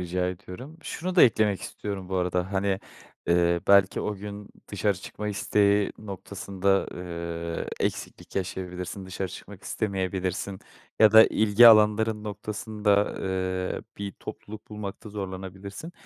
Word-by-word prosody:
Rica 90 +1 -1
ediyorum. 95 - -8
Şunu 180 +4 -4
da - - +8
eklemek 110 -4 +4
istiyorum 100 -3 -5
bu 95 - -1
arada; 90 +1 -1
hani, 100 0 0 0.5
eee, 85 0 +3
belki 100 -1 +5
o 105 - -2
gün 100 +1 -8 0.2
dışarı 100 0 0
çıkma 105 +2 -6
isteği 100 0 +2
noktasında, 100 -1 -1
eee, 85 -1 -4 0.2
eksiklik - - -7
yaşayabilirsin 90 0 -4
dışarı 95 0 -4
çıkmak 95 +2 -11
istemeyebilirsin 95 -1 -2 0.4
ya 110 -1 +7
da 110 0 +10
ilgi 110 +2 +6
alanların 110 0 +4
noktasında, 105 0 0
eee, 95 -1 -2 0.2
bir 100 -1 -4
topluluk 105 0 -10
bulmakta 105 0 -6
zorlanabilirsin. 95 - -7
100 Hz, 125 wpm, -27 LUFS, 95-105 Hz, 0.5 s, da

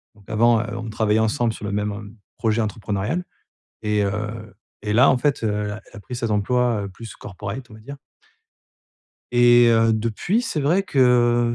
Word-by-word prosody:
Donc 100 -2 -22
avant, 115 +1 +3
heu, 115 -1 -6
on 115 -1 -5
travaillait 110 0 +1
ensemble 110 +1 0
sur 105 - -8
le 100 - -3
même, 105 +1 -1
heu, 105 0 -9 0.3
projet 115 0 +1
entrepreneurial. 105 - -2 0.6
Et 105 -1 +1
heu, 105 +1 -4 0.3
et 105 0 -2
là 125 +5 +6
en 130 - +2
fait, 140 -3 0
heu, 110 - +2 0.2
elle 105 - -4
a 105 -1 -8
elle - - -16
a - - -11
pris 125 +4 -7
cet 115 -2 -2
emploi, 120 +1 +1
heu, - - -5
plus 115 +4 -10
corporate 105 +5 -7
on - - -12
va 110 - -13
dire 140 +5 -10 1.3
et 120 0 +6
heu, 115 0 +4
depuis, 115 - 0
c'est 170 -10 -2
vrai 165 +8 +2
que 140 - -3
heu 120 -1 +3
115 Hz, 205 wpm, -22 LUFS, 105-120 Hz, 1.3 s, là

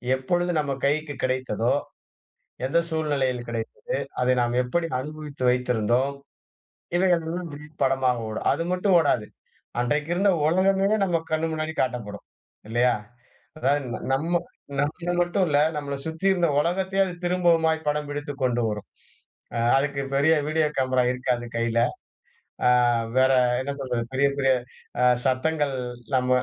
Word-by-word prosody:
எப்பொழுது 175 +7 0
நம்ம 145 -2 -1
கைக்கு 150 +1 0
கிடைத்ததோ, 130 -3 0 0.9
எந்த 140 +6 +2
சூழ்நிலையில் 140 -6 -1
கிடைத்தது? 115 - -5 0.4
அதை 125 0 +3
நாம் 120 0 0
எப்படி 165 +7 -1
அனுபவித்து 150 -1 -8
வைத்திருந்தோம்? 125 +2 +1 0.8
இவைகள் 175 -2 +3
எல்லாம் 175 +1 -4 0.2
இப்ப 155 - -29
படமா 130 -1 +2 0.2
ஓடும். 110 0 -3
அது 165 - -2
மட்டும் 185 +1 +2
ஓடாது 125 -9 +1 0.5
அன்றைக்கு 145 +5 0
இருந்த 200 +3 +3 0.2
ஓலகமே 190 +4 +3 0.2
நம்ம 175 -3 +1
கண்ணு 160 +1 +1
முன்னாடி 155 0 -3
காட்டப்படும். 115 -5 -3 0.4
இல்லையா? 120 +2 +3 0.6
அதாவது 145 0 +1 0.3
நம்ம 165 +6 +1 0.4
நம்ம 170 +4 -2
மட்டும் 180 +2 0
இல்ல, 145 -1 +3 0.2
நம்மள 140 -1 -3
சுற்றி 160 +3 -5
இருந்த 175 -3 +1
உலகத்தையே 190 +3 +1
அது 180 - -5
திரும்பவுமா 170 -2 +3 0.2
படம் 150 0 -1
பிடித்துக் 145 -1 -5
கொண்டு 120 -1 +1
வரும். 105 -1 -5 0.9
அதுக்கு 140 0 0
பெரிய 145 +4 +4
வீடியோ 155 0 +2
கேமரா 130 -1 +2
இருக்காது 125 -1 -1
கையில. 115 0 0 0.9
ஆ - - +7 0.5
வேற 130 +1 +5 0.3
என்ன 140 +2 -3
சொல்றது, 125 -3 -2
பெரிய 140 +1 +3
பெரிய 135 -1 +3 0.7
சத்தங்கள் 140 +2 +1 0.4
நம்ம 125 -1 +2
145 Hz, 130 wpm, -25 LUFS, 130-165 Hz, 0.9 s, ஆ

